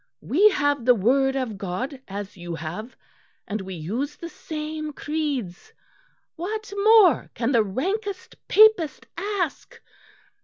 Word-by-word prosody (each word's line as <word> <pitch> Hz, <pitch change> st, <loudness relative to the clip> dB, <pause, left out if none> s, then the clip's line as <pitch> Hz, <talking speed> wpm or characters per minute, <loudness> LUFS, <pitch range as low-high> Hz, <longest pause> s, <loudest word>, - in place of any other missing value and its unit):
We 400 Hz, +9 st, +5 dB
have 290 Hz, -, 0 dB
the 250 Hz, -1 st, +6 dB
Word 265 Hz, +6 st, +2 dB
of 240 Hz, -7 st, -3 dB
God 250 Hz, +9 st, -4 dB
as 200 Hz, 0 st, -6 dB
you 175 Hz, -2 st, -6 dB
have, 170 Hz, -, -7 dB, 0.5 s
and 210 Hz, 0 st, -3 dB
we 190 Hz, -1 st, -7 dB
use 230 Hz, -, -3 dB
the 335 Hz, -, -8 dB
same 310 Hz, -1 st, -6 dB
creeds. 295 Hz, -, -4 dB, 0.6 s
What 415 Hz, +4 st, -5 dB
more 410 Hz, -3 st, +5 dB
can 235 Hz, +2 st, 0 dB
the 235 Hz, -4 st, +4 dB
rankest 370 Hz, -, -3 dB
Papist 420 Hz, -9 st, +5 dB
ask? 375 Hz, -4 st, -3 dB
285 Hz, 125 wpm, -24 LUFS, -, 0.6 s, the